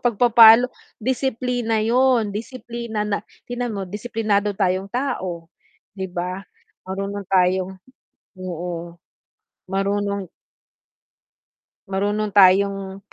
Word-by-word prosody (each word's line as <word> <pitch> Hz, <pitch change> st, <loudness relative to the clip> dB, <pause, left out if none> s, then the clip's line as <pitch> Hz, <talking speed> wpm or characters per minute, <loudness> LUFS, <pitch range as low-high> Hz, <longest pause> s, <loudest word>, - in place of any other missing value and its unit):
pagpapalo 235 Hz, +1 st, +7 dB, 0.3 s
disiplina 245 Hz, -2 st, -1 dB
yun 240 Hz, -2 st, +3 dB
disiplina 235 Hz, -1 st, -5 dB
natin 240 Hz, +4 st, -5 dB
mo 200 Hz, -, -3 dB
disiplinado 210 Hz, 0 st, -1 dB
tayong 190 Hz, 0 st, 0 dB
tao 185 Hz, -10 st, -3 dB, 0.5 s
di 190 Hz, -1 st, -4 dB
ba 180 Hz, +1 st, -3 dB, 0.5 s
marunong 195 Hz, +1 st, -4 dB
tayong 185 Hz, 0 st, +2 dB, 0.7 s
oo, 175 Hz, -1 st, -6 dB, 0.7 s
marunong 200 Hz, 0 st, -1 dB, 1.6 s
marunong 205 Hz, +2 st, -1 dB
tayong 195 Hz, 0 st, +4 dB
200 Hz, 80 wpm, -22 LUFS, 190-230 Hz, 1.6 s, pagpapalo